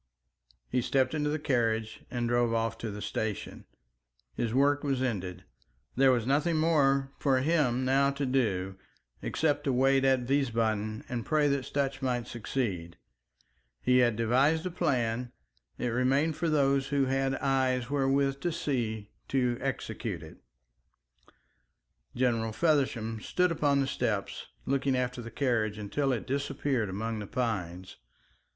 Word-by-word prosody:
He 125 Hz, -, 0 dB
stepped 130 Hz, +3 st, +1 dB
into 150 Hz, -1 st, 0 dB
the 150 Hz, -, 0 dB
carriage 115 Hz, -6 st, 0 dB
and 120 Hz, -1 st, -2 dB
drove 120 Hz, -1 st, +2 dB
off 115 Hz, 0 st, 0 dB
to 115 Hz, -, -4 dB
the 105 Hz, 0 st, -6 dB
station. 110 Hz, -1 st, -4 dB, 0.7 s
His 115 Hz, -, -2 dB
work 140 Hz, +3 st, +3 dB
was 135 Hz, -3 st, 0 dB
ended. 95 Hz, -8 st, -3 dB, 0.5 s
There 135 Hz, +1 st, +5 dB
was 120 Hz, -3 st, +1 dB
nothing 150 Hz, +6 st, +2 dB
more 140 Hz, -4 st, +2 dB
for 130 Hz, -3 st, +2 dB
him 135 Hz, -5 st, +2 dB
now 135 Hz, +1 st, +3 dB
to 140 Hz, 0 st, -2 dB
do, 100 Hz, -8 st, 0 dB, 0.4 s
except 150 Hz, -2 st, 0 dB
to 140 Hz, -, +2 dB
wait 135 Hz, +1 st, +3 dB
at 130 Hz, -2 st, +3 dB
Wiesbaden 110 Hz, -5 st, 0 dB
and 120 Hz, -2 st, -3 dB
pray 150 Hz, +2 st, +2 dB
that 140 Hz, -2 st, 0 dB
Sutch 140 Hz, -1 st, -2 dB
might 125 Hz, -3 st, -1 dB
succeed. 100 Hz, -8 st, -3 dB, 0.8 s
He 125 Hz, 0 st, +3 dB
had 120 Hz, -3 st, +3 dB
devised 130 Hz, +8 st, +2 dB
the 185 Hz, -, -3 dB
plan, 120 Hz, -6 st, 0 dB, 0.5 s
it 125 Hz, -, -1 dB
remained 135 Hz, +6 st, +1 dB
for 170 Hz, -, -1 dB
those 140 Hz, -2 st, +2 dB
who 140 Hz, -1 st, +1 dB
had 135 Hz, 0 st, 0 dB
eyes 130 Hz, -2 st, 0 dB
wherewith 135 Hz, 0 st, +1 dB
to 175 Hz, +5 st, -1 dB
see 120 Hz, -10 st, -2 dB, 0.2 s
to 125 Hz, -3 st, 0 dB
execute -, -, -3 dB
it. -, -, -12 dB, 1.8 s
General 115 Hz, -3 st, +1 dB
Feversham 115 Hz, -5 st, +1 dB
stood 180 Hz, +7 st, +1 dB
upon 145 Hz, -3 st, +2 dB
the -, -, +1 dB
steps 135 Hz, -, -2 dB, 0.2 s
looking 135 Hz, 0 st, +1 dB
after 125 Hz, -1 st, -2 dB
the 115 Hz, -, -7 dB
carriage 110 Hz, -4 st, 0 dB
until 135 Hz, +7 st, -1 dB
it 120 Hz, -4 st, -2 dB
disappeared 135 Hz, -4 st, -1 dB
among 110 Hz, +3 st, -3 dB
the 105 Hz, -, -6 dB
pines. 95 Hz, -7 st, -3 dB
130 Hz, 145 wpm, -29 LUFS, 115-140 Hz, 1.8 s, There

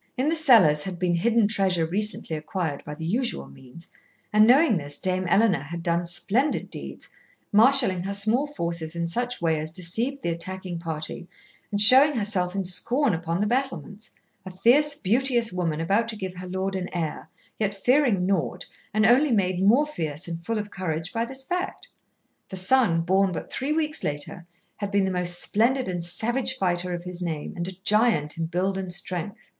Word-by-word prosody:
In 265 Hz, +4 st, +1 dB
the 325 Hz, -, +1 dB
cellars 225 Hz, -, +5 dB
had 185 Hz, -2 st, -5 dB
been 180 Hz, 0 st, 0 dB
hidden 230 Hz, +3 st, +2 dB
treasure 190 Hz, -5 st, +1 dB
recently 200 Hz, -1 st, -1 dB
acquired 155 Hz, -1 st, -4 dB
by 150 Hz, -, -7 dB
the 160 Hz, -, -7 dB
usual 210 Hz, -, -2 dB
means, 125 Hz, -, -15 dB, 0.5 s
and 215 Hz, +1 st, +6 dB
knowing 265 Hz, -, +5 dB
this, 145 Hz, -2 st, -5 dB
Dame 185 Hz, 0 st, 0 dB
Ellena 195 Hz, -4 st, +3 dB
had 170 Hz, +3 st, -7 dB
done 170 Hz, 0 st, 0 dB
splendid 235 Hz, -, 0 dB
deeds, -, -, -8 dB, 0.4 s
marshalling 225 Hz, -4 st, +4 dB
her 195 Hz, +2 st, -4 dB
small 220 Hz, +8 st, +1 dB
forces 170 Hz, -, -4 dB
in 170 Hz, 0 st, -2 dB
such 245 Hz, +3 st, -3 dB
way 160 Hz, -2 st, +1 dB
as 155 Hz, +1 st, -4 dB
deceived 225 Hz, -, -2 dB
the 170 Hz, -, 0 dB
attacking 180 Hz, +1 st, -5 dB
party 160 Hz, +1 st, -6 dB, 0.4 s
and 205 Hz, -, -2 dB
showing 260 Hz, +8 st, +8 dB
herself 200 Hz, -6 st, -1 dB
in 195 Hz, -, -1 dB
scorn 215 Hz, -, 0 dB
upon 165 Hz, +1 st, -2 dB
the -, -, +2 dB
battlements, 225 Hz, -3 st, -3 dB, 0.3 s
a 185 Hz, -, -8 dB
fierce, 275 Hz, +10 st, +3 dB
beauteous 240 Hz, 0 st, +1 dB
woman 165 Hz, -4 st, -2 dB
about 200 Hz, +8 st, +1 dB
to 230 Hz, -, -5 dB
give 190 Hz, -3 st, -6 dB
her 180 Hz, 0 st, -7 dB
lord 190 Hz, +1 st, -3 dB
an 185 Hz, -1 st, -4 dB
heir, 165 Hz, -4 st, -4 dB, 0.3 s
yet 205 Hz, -2 st, -1 dB
fearing 240 Hz, -3 st, +2 dB
naught, 180 Hz, -1 st, -1 dB, 0.3 s
and 215 Hz, 0 st, +3 dB
only 255 Hz, +6 st, +4 dB
made 185 Hz, -4 st, +1 dB
more 235 Hz, +10 st, +4 dB
fierce 160 Hz, -, -4 dB
and 170 Hz, 0 st, -6 dB
full 225 Hz, +5 st, -2 dB
of 205 Hz, -1 st, -5 dB
courage 165 Hz, -2 st, -4 dB
by 230 Hz, 0 st, -1 dB
this 265 Hz, +2 st, -6 dB
fact. 360 Hz, +5 st, -4 dB, 0.6 s
The 190 Hz, -, -4 dB
son, 185 Hz, -3 st, +3 dB
born 190 Hz, +3 st, +2 dB
but -, -, -7 dB
three 270 Hz, +3 st, -2 dB
weeks 310 Hz, 0 st, -1 dB
later, 145 Hz, +4 st, -4 dB, 0.3 s
had 205 Hz, -1 st, -4 dB
been 200 Hz, -1 st, +1 dB
the 190 Hz, -, -1 dB
most 175 Hz, -1 st, +1 dB
splendid 250 Hz, +8 st, +1 dB
and 175 Hz, -2 st, -3 dB
savage 230 Hz, +9 st, 0 dB
fighter 180 Hz, -1 st, -1 dB
of 175 Hz, -, -7 dB
his 180 Hz, 0 st, -7 dB
name, 160 Hz, -4 st, -4 dB
and 175 Hz, -1 st, -3 dB
a 190 Hz, -, -6 dB
giant 210 Hz, -9 st, +2 dB
in 165 Hz, -, -1 dB
build 185 Hz, +3 st, -1 dB
and 185 Hz, -2 st, -5 dB
strength. 175 Hz, +2 st, -3 dB
190 Hz, 190 wpm, -25 LUFS, 170-230 Hz, 0.6 s, showing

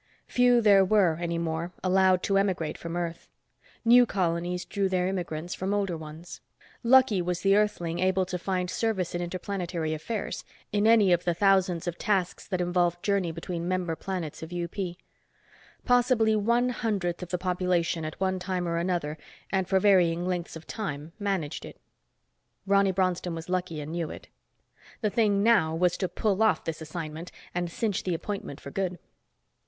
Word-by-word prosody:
Few 245 Hz, -1 st, +4 dB
there 200 Hz, -3 st, +6 dB
were, 185 Hz, -5 st, +3 dB
any 170 Hz, -1 st, -1 dB
more, 170 Hz, +1 st, -3 dB
allowed 185 Hz, 0 st, +3 dB
to 195 Hz, -, +1 dB
emigrate 185 Hz, -6 st, -1 dB
from 170 Hz, +1 st, -5 dB
Earth. 170 Hz, -1 st, -4 dB, 0.6 s
New 245 Hz, +1 st, +7 dB
colonies 175 Hz, -1 st, -1 dB
drew 200 Hz, -2 st, -1 dB
their 180 Hz, -1 st, +1 dB
immigrants 175 Hz, -3 st, -3 dB
from 195 Hz, +2 st, -2 dB
older 195 Hz, -4 st, 0 dB
ones. 160 Hz, +2 st, -9 dB, 0.4 s
Lucky 240 Hz, -5 st, +5 dB
was 175 Hz, 0 st, -2 dB
the 195 Hz, 0 st, +4 dB
Earthling 175 Hz, -5 st, 0 dB
able 185 Hz, 0 st, +2 dB
to 180 Hz, 0 st, -4 dB
find 180 Hz, 0 st, -1 dB
service 215 Hz, -6 st, -1 dB
in 175 Hz, -, -2 dB
interplanetary 175 Hz, -2 st, -3 dB
affairs, 205 Hz, +8 st, -4 dB, 0.3 s
in 205 Hz, +1 st, +2 dB
any 220 Hz, -4 st, +6 dB
of 175 Hz, 0 st, +1 dB
the 175 Hz, -1 st, 0 dB
thousands 190 Hz, -3 st, +2 dB
of 175 Hz, -1 st, -4 dB
tasks 195 Hz, -5 st, -1 dB
that 185 Hz, -3 st, -2 dB
involved 175 Hz, -1 st, +1 dB
journey 200 Hz, -4 st, +1 dB
between 170 Hz, +1 st, -5 dB
member 180 Hz, -2 st, -1 dB
planets 175 Hz, -4 st, -5 dB
of 160 Hz, +1 st, -8 dB
UP. 175 Hz, -1 st, -4 dB, 1.1 s
Possibly 245 Hz, -3 st, +3 dB
one 235 Hz, +4 st, +2 dB
hundredth 200 Hz, -8 st, -2 dB
of 180 Hz, -, -6 dB
the 180 Hz, -, -1 dB
population 180 Hz, -2 st, 0 dB
at 155 Hz, 0 st, -6 dB
one 190 Hz, 0 st, 0 dB
time 180 Hz, -1 st, -2 dB
or 170 Hz, 0 st, -1 dB
another, 170 Hz, -3 st, -1 dB, 0.3 s
and 190 Hz, -2 st, 0 dB
for 190 Hz, -1 st, +4 dB
varying 180 Hz, -4 st, +4 dB
lengths 180 Hz, -2 st, -3 dB
of 160 Hz, 0 st, -10 dB
time, 155 Hz, -7 st, -5 dB
managed 195 Hz, -7 st, -2 dB
it. -, -, -11 dB, 0.9 s
Ronny 200 Hz, 0 st, +4 dB
Bronston 180 Hz, -2 st, 0 dB
was 165 Hz, +1 st, -7 dB
lucky 180 Hz, -3 st, -2 dB
and 150 Hz, +1 st, -6 dB
knew 170 Hz, -1 st, -2 dB
it. -, -, -10 dB, 0.7 s
The 210 Hz, -3 st, +1 dB
thing 205 Hz, -3 st, +2 dB
now 200 Hz, -9 st, +4 dB
was 175 Hz, +1 st, +2 dB
to 185 Hz, -, -1 dB
pull 200 Hz, +3 st, 0 dB
off 220 Hz, -1 st, +3 dB
this 165 Hz, -1 st, -4 dB
assignment 160 Hz, +1 st, -6 dB, 0.2 s
and 175 Hz, 0 st, -1 dB
cinch 205 Hz, +2 st, -1 dB
the 180 Hz, -2 st, -1 dB
appointment 195 Hz, -5 st, -5 dB
for 140 Hz, -, -9 dB
good. 185 Hz, 0 st, -2 dB
180 Hz, 170 wpm, -27 LUFS, 170-200 Hz, 1.1 s, New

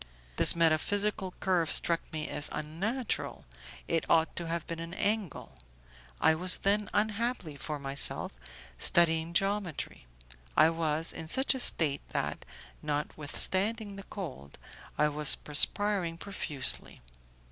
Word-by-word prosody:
This -, -, +9 dB
metaphysical 185 Hz, +4 st, +1 dB
curve 175 Hz, -5 st, 0 dB
struck 170 Hz, -1 st, +2 dB
me 155 Hz, -1 st, -4 dB
as 145 Hz, -, 0 dB
unnatural, 195 Hz, -, -4 dB, 0.4 s
it 165 Hz, -1 st, 0 dB
ought 160 Hz, 0 st, +2 dB
to 170 Hz, -, -3 dB
have 170 Hz, 0 st, -3 dB
been 165 Hz, -1 st, -6 dB
an 165 Hz, +2 st, -7 dB
angle; 205 Hz, -, -3 dB, 0.6 s
I 160 Hz, -, +4 dB
was 180 Hz, +3 st, +5 dB
then, 205 Hz, +1 st, 0 dB
unhappily 215 Hz, -, -1 dB
for 150 Hz, +2 st, -5 dB
myself, 140 Hz, 0 st, +2 dB, 0.5 s
studying 165 Hz, -, +3 dB
geometry. 195 Hz, -, -2 dB, 0.5 s
I 160 Hz, -, +6 dB
was 165 Hz, -1 st, -2 dB
in 160 Hz, -, -8 dB
such 265 Hz, -, +1 dB
a 265 Hz, -, -4 dB
state 150 Hz, -, +4 dB
that, -, -, -3 dB, 0.4 s
notwithstanding 185 Hz, +8 st, -1 dB
the 195 Hz, -, -8 dB
cold, 135 Hz, -, -8 dB, 0.4 s
I 150 Hz, -, +3 dB
was 150 Hz, 0 st, +3 dB
perspiring 175 Hz, +3 st, +1 dB
profusely. 160 Hz, -8 st, -3 dB
165 Hz, 125 wpm, -29 LUFS, 155-200 Hz, 0.6 s, This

